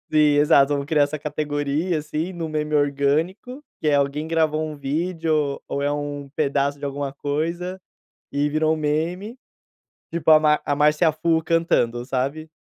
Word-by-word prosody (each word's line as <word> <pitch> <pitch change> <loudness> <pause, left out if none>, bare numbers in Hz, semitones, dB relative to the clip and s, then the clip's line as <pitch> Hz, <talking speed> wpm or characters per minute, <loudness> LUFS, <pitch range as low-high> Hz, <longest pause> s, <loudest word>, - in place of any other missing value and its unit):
exato, 145 -1 +4
criar 150 -1 +3
essa 145 +2 -2
categoria, 150 +2 -2
assim, 155 +4 -3
no 165 -2 -4
meme 150 0 -2
orgânico, 150 - 0 0.2
que 155 - -1
é 145 - +4
alguém, 140 +2 0
gravou 155 -1 +1
um 155 -1 -5
vídeo 155 0 -1
ou 140 - -3
é 145 +1 +1
um 145 -1 -4
pedaço 140 -1 0
de 145 - -6
alguma 140 0 -3
coisa, 170 +6 -3 0.5
e 145 +1 0
virou 155 +1 +1
um 160 - -2
meme. 170 - -2 0.8
Tipo 165 -1 +1
a 155 - +7
ma 150 -1 +3
a 145 - +1
Márcia 150 +3 +3
Fu 160 +1 +1
cantando, 160 -8 +1
sabe, 140 +5 -3
150 Hz, 155 wpm, -23 LUFS, 145-160 Hz, 0.8 s, a